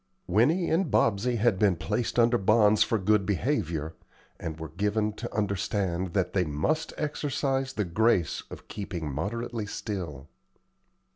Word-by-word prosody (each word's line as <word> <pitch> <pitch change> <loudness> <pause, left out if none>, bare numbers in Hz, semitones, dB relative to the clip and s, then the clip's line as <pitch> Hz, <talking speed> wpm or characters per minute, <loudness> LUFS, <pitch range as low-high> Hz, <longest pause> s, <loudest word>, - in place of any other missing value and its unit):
Winnie 130 - +3
and 165 0 +2
Bobsey 110 +2 +2
had 110 -3 +2
been 100 -4 +4
placed 80 +11 -2
under 120 0 +4
bonds 105 +1 +4
for 115 - +3
good 105 +1 +2
behavior, 90 - -1 0.5
and 80 -1 -5
were 80 -1 -6
given 105 +5 0
to - - -6
understand 95 -3 -1
that 95 -2 0
they 95 - +2
must 80 - -1
exercise 140 -3 -1
the 105 - -1
grace 90 -2 +2
of - - -10
keeping 90 -7 -5
moderately 110 - -3
still. 85 - -5
105 Hz, 140 wpm, -28 LUFS, 90-120 Hz, 0.5 s, been